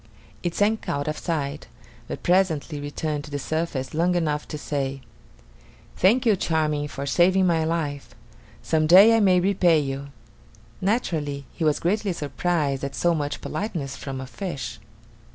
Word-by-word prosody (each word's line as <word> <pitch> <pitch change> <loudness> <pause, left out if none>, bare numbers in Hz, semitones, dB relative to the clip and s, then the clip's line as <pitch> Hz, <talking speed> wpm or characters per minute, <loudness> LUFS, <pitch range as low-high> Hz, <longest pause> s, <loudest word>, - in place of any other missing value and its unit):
It 175 -1 -3
sank 215 +2 +1
out 145 +1 -2
of 155 - -2
sight, 150 -4 -3 0.4
but - - -6
presently 170 -5 +1
returned 145 +1 -3
to - - -11
the 145 - -3
surface 150 -3 -3
long 175 +3 +2
enough 150 -4 -1
to 150 - -5
say: 135 -2 -3 0.9
"Thank 230 +8 +3
you, 220 -3 +5
Charming, 155 -4 0
for 140 -1 -6
saving 185 +5 +3
my 165 -3 +2
life. 155 -4 -3 0.5
Some 155 -1 +1
day 195 +7 +8
I - - +4
may 185 -4 +4
repay 180 -3 +3
you." 140 -1 -4 0.7
Naturally, 160 - -1
he - - -4
was 155 -2 +2
greatly 200 +2 0
surprised 145 -1 -1
at 140 - -4
so 175 0 +2
much 145 -2 -3
politeness 155 -6 -4
from 135 -2 -6
a 130 - -5
fish. 170 +1 -6
160 Hz, 155 wpm, -24 LUFS, 145-180 Hz, 0.9 s, day